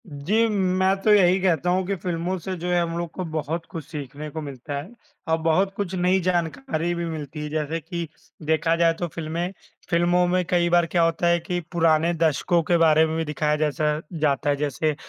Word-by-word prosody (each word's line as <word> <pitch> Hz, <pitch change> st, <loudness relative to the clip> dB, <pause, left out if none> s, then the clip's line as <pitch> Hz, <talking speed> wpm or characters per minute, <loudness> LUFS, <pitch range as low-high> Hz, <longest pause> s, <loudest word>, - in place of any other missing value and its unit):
जी, 185 Hz, +10 st, +1 dB
मैं 190 Hz, -2 st, +2 dB
तो 215 Hz, -, +3 dB
यही 190 Hz, -2 st, +5 dB
कहता 175 Hz, -2 st, +1 dB
हूँ 185 Hz, +1 st, +1 dB
कि 200 Hz, -, 0 dB
फ़िल्मों 175 Hz, +1 st, -2 dB
से 185 Hz, +3 st, -4 dB
जो 175 Hz, +1 st, -5 dB
है 175 Hz, -1 st, +3 dB
हम 170 Hz, 0 st, -2 dB
लोग 170 Hz, -1 st, -3 dB
को 185 Hz, -, -4 dB
बहुत 160 Hz, +1 st, -3 dB
कुछ 160 Hz, -4 st, -7 dB
सीखने 145 Hz, 0 st, -7 dB
को 160 Hz, +1 st, -6 dB
मिलता 140 Hz, 0 st, -7 dB
हैं 175 Hz, +12 st, -8 dB, 0.3 s
और 160 Hz, -, +3 dB
बहुत 185 Hz, +5 st, +2 dB
कुछ 195 Hz, -3 st, -3 dB
नई 180 Hz, +1 st, +2 dB
जानकारी 165 Hz, -2 st, -1 dB
भी 170 Hz, 0 st, -3 dB
मिलती 155 Hz, -2 st, -6 dB
है, 150 Hz, -, -4 dB
जैसे 155 Hz, +1 st, -2 dB
कि 170 Hz, +1 st, -5 dB, 0.4 s
देखा 160 Hz, +1 st, +2 dB
जाए 165 Hz, 0 st, +3 dB
तो 175 Hz, -, -1 dB
फ़िल्में 165 Hz, +2 st, -4 dB, 0.4 s
फ़िल्मों 175 Hz, +1 st, +3 dB
में 180 Hz, +1 st, +1 dB
कई 175 Hz, -1 st, +2 dB
बार 175 Hz, 0 st, +4 dB
क्या 170 Hz, +1 st, +1 dB
होता 165 Hz, +1 st, +1 dB
है 170 Hz, 0 st, +3 dB
कि 175 Hz, +1 st, -3 dB
पुराने 165 Hz, 0 st, +3 dB
दशकों 165 Hz, +2 st, +2 dB
के 170 Hz, +2 st, +2 dB
बारे 160 Hz, -1 st, +5 dB
में 160 Hz, 0 st, -3 dB
भी 165 Hz, -, -1 dB
दिखाया 150 Hz, 0 st, 0 dB
जैसा 150 Hz, 0 st, 0 dB, 0.2 s
जाता 145 Hz, -1 st, +1 dB
है, 145 Hz, -, +3 dB
जैसे 150 Hz, +1 st, -1 dB
165 Hz, 210 wpm, -24 LUFS, 155-175 Hz, 0.4 s, यही